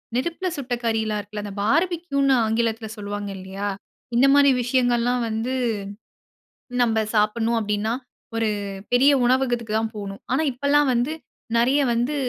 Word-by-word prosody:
நெருப்பில 340 +8 -1
சுட்ட 255 -3 -4
கறியலாம் 220 -2 0
இருக்குல்ல. 205 +1 -6
அந்த 200 - -6
பார்பிக்யூன்னு 290 - +1
ஆங்கிலத்தில 225 0 0
சொல்லுவாங்க 205 0 -5
இல்லையா, 190 +2 -5 0.5
இந்த 255 +3 +5
மாரி 280 -1 +6
விஷயங்கள்லாம் 245 0 +1
வந்து 225 +4 -2 1.3
நம்ம 225 -2 +2 0.2
சாப்பிடணும். 225 +2 +2
அப்படின்னா 210 +1 -1 0.4
ஒரு 225 -1 +1 0.4
பெரிய 270 +4 +6
உணவகத்துக்கு 240 -3 +1
தான் 220 0 -2
போகணும். 200 -1 -7
ஆனா 270 +5 +2
இப்பல்லாம் 280 +2 +2
வந்து 245 +6 0 0.5
நிறைய 260 +5 +3
வந்து 245 +6 0
235 Hz, 125 wpm, -23 LUFS, 215-265 Hz, 1.3 s, மாரி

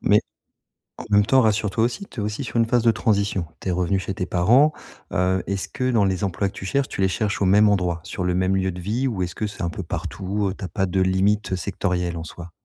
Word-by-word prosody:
Mais, - - +4 0.8
en - - -7
même 105 0 +4
temps 130 +2 +5
rassures 110 -1 +2
toi 110 +3 0
aussi, 125 - -1
tu 115 - -7
es - - -2
aussi 105 +6 -3
sur - - -8
une 115 - +4
phase 120 0 +2
de 115 - +5
transition. 100 -5 0
Tu - - -7
es - - +1
revenue 90 +2 +1
chez 95 - -4
tes 95 -2 -3
parents, 120 +13 +4 0.4
heu, 90 +1 +1
est-ce 100 -1 -2
que 130 0 -1
dans 110 -4 +3
les 95 +1 -1
emplois 100 +1 0
que 95 - -7
tu - - -8
cherches, 140 +7 0
tu - - -4
les 95 - +3
cherches 100 +1 -1
au - - +3
même 105 +3 +5
endroit, 90 -4 +1
sur 90 - -5
le 90 - +1
même 95 +1 +1
lieu 95 0 0
de 90 - -8
vie 115 +8 -1
ou 100 -8 -1
est-ce 90 0 -5
que 110 - -2
c'est 105 - -7
un 85 - 0
peu 85 - -6
partout, 100 +1 -3
heu, 95 - -7
tu - - -9
as 95 - -2
pas 95 +4 0
de 95 +1 0
limite, 95 +3 +1
heu, 95 - +1
sectorielle, 90 -2 -2
en 80 - -5
soi? 85 +1 -9
95 Hz, 280 wpm, -23 LUFS, 90-105 Hz, 0.8 s, temps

